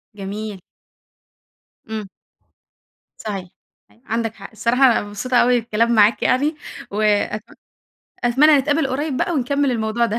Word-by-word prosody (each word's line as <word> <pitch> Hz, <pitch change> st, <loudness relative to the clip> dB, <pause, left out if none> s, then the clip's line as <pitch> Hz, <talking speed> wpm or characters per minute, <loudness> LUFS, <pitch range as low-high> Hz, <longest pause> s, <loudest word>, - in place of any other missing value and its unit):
جميل. 205 Hz, 0 st, -6 dB, 1.3 s
إمم. 215 Hz, -3 st, -5 dB, 1.1 s
صحيح، 195 Hz, -4 st, -5 dB, 0.6 s
عندك 225 Hz, -1 st, -2 dB
حق، -, -, -10 dB
الصراحة 235 Hz, +4 st, +1 dB
أنا 240 Hz, -, +4 dB
مبسوطة 205 Hz, +5 st, -2 dB
أوي 245 Hz, 0 st, +4 dB
بالكلام 230 Hz, +1 st, 0 dB
معاك 215 Hz, +1 st, +4 dB
يعني 290 Hz, +5 st, +2 dB, 0.4 s
وأت 210 Hz, 0 st, +1 dB, 0.8 s
أتمنى 270 Hz, +6 st, +5 dB
نتقابل 290 Hz, +2 st, +1 dB
قريب 275 Hz, +1 st, -2 dB
بقى 300 Hz, -, 0 dB
ونكمل 280 Hz, -1 st, 0 dB
الموضوع 230 Hz, 0 st, 0 dB
ده. 230 Hz, 0 st, -2 dB
230 Hz, 120 wpm, -20 LUFS, 210-260 Hz, 1.3 s, أتمنى